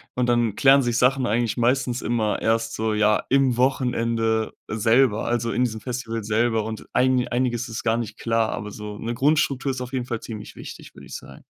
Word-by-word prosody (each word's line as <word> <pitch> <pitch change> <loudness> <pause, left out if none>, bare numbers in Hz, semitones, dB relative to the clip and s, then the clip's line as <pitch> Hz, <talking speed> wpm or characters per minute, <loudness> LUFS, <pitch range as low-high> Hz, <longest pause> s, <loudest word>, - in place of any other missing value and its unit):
und 125 -1 0
dann 120 -3 +1
klären 140 0 +6
sich 120 -2 0
Sachen 130 +1 +3
eigentlich 115 0 0
meistens 125 +1 0
immer 110 -3 -1
erst 115 +1 0
so, 110 0 -1
ja, 105 0 +2
im 135 -2 +3
Wochenende 115 -3 0 0.2
selber, 115 +1 +2
also, 120 -1 -1
in 125 - +1
diesem 110 -3 -2
Festival 120 -3 -4
selber. 110 +1 +1
Und 110 0 -6
eini 130 -1 +2
einiges 120 -1 -1
ist 115 - -5
gar 115 -1 +2
nicht 110 -2 -5
klar, 115 -1 0
aber 105 0 -5
so 105 0 -8
'ne 115 +2 -4
Grundstruktur 135 0 +1
ist 130 - -5
auf 125 +1 -7
jeden 125 -2 -2
Fall 120 -2 -3
ziemlich 110 -2 -9
wichtig, - - -10
würde - - -13
ich - - -9
sagen. 65 0 -11
120 Hz, 200 wpm, -23 LUFS, 110-125 Hz, 0.2 s, klären